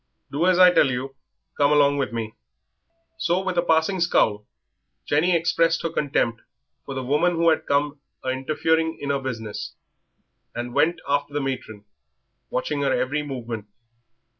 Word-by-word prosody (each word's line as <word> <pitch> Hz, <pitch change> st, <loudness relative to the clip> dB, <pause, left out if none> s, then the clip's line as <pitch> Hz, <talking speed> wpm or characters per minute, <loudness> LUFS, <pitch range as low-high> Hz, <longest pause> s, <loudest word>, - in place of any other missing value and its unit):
"Do 155 Hz, +6 st, +1 dB
as 185 Hz, -1 st, +4 dB
I 180 Hz, -1 st, +8 dB
tell 145 Hz, -, +4 dB
you. 130 Hz, +2 st, -4 dB, 0.4 s
Come 145 Hz, 0 st, +3 dB
along 145 Hz, -1 st, +4 dB
with 135 Hz, -, -1 dB
me." 115 Hz, -2 st, -4 dB, 0.9 s
So 170 Hz, +8 st, +1 dB
with 185 Hz, -1 st, -2 dB
a 175 Hz, -, +3 dB
passing 165 Hz, +3 st, +2 dB
scowl 105 Hz, -11 st, +2 dB, 0.6 s
Jenny 165 Hz, +5 st, +2 dB
expressed 165 Hz, 0 st, +2 dB
her 165 Hz, -, -1 dB
contempt 120 Hz, -5 st, 0 dB, 0.5 s
for 135 Hz, -, -5 dB
the 130 Hz, -, -3 dB
woman 150 Hz, +7 st, +2 dB
who 165 Hz, 0 st, +3 dB
had 160 Hz, -, 0 dB
come 145 Hz, 0 st, 0 dB, 0.2 s
"a -, -, 0 dB
interfering 160 Hz, +5 st, 0 dB
in 140 Hz, -, -2 dB
'er 140 Hz, -, 0 dB
business," 115 Hz, -5 st, -5 dB, 0.8 s
and 120 Hz, 0 st, -4 dB
went 155 Hz, +5 st, +2 dB
after 145 Hz, 0 st, -1 dB
the -, -, +1 dB
matron, 120 Hz, -6 st, -5 dB, 0.6 s
watching 145 Hz, +3 st, -2 dB
her 140 Hz, -1 st, +1 dB
every 145 Hz, +4 st, 0 dB
movement. 120 Hz, -7 st, -6 dB
145 Hz, 160 wpm, -24 LUFS, 130-160 Hz, 0.9 s, I